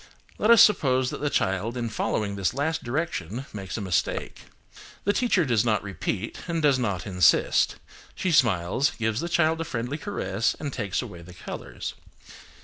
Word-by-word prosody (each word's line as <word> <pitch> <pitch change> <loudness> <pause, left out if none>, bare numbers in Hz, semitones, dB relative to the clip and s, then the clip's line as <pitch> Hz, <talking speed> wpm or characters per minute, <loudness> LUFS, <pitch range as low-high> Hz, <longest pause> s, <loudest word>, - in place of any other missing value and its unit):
Let 215 - +2
us 235 -2 +9
suppose 130 -10 +3
that - - -6
the 145 - +1
child 105 +2 0
in 120 -1 -2
following 105 -2 -2
this 100 +4 -1
last 160 +3 -1
direction 130 - -3
makes 100 -1 -5
a - - -4
mistake. 95 -3 -2 0.6
The 205 - +2
teacher 205 -9 +2
does 115 -6 +2
not 110 -4 +1
repeat 100 +1 -4
and 170 -1 -1
does 145 -4 +3
not 100 -7 -2
insist; 90 -5 +3 0.4
she 185 - -1
smiles, 115 - +2
gives 110 -1 0
the 170 - -3
child 165 -1 +2
a - - 0
friendly 125 0 -4
caress 115 - -1
and 145 -3 -4
takes 100 -6 -2
away 85 - -9
the 90 +1 -13
colours. - - -7
120 Hz, 170 wpm, -26 LUFS, 100-155 Hz, 0.6 s, us